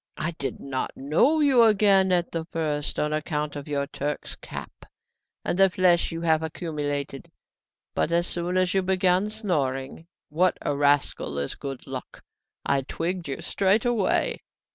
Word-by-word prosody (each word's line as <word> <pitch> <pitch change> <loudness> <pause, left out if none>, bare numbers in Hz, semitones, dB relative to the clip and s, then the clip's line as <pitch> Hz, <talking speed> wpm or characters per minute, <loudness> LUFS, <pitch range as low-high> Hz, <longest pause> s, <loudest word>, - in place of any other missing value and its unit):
I 170 - -1
did 140 - -3
not 135 -1 -3
know 170 - +3
you 270 -5 +5
again 200 -4 +5
at 175 -1 +1
the 165 -1 -3
first, 155 -3 -2
on 150 0 0
account 150 -1 -2
of 145 0 -7
your 140 -1 -1
Turk's 145 0 -4
cap - - -9 0.6
and 175 - -1
the 195 0 +7
flesh 180 -2 +3
you 165 0 -5
have 160 -2 +2
accumulated; 145 -4 -4 0.6
but 160 - 0
as 170 +1 +3
soon 175 +1 -1
as 185 -1 +2
you 195 - +3
began 185 +1 +2
snoring 155 - -2 0.2
what 175 +4 +2
a 145 - 0
rascal 145 - +1
is 70 0 -2
good 135 -3 -7
luck! - - -8 0.4
I 140 -1 +2
twigged 170 +5 -3
you 135 - -5
straight 200 +3 +2
away." 230 -6 +1
165 Hz, 160 wpm, -25 LUFS, 145-185 Hz, 0.6 s, the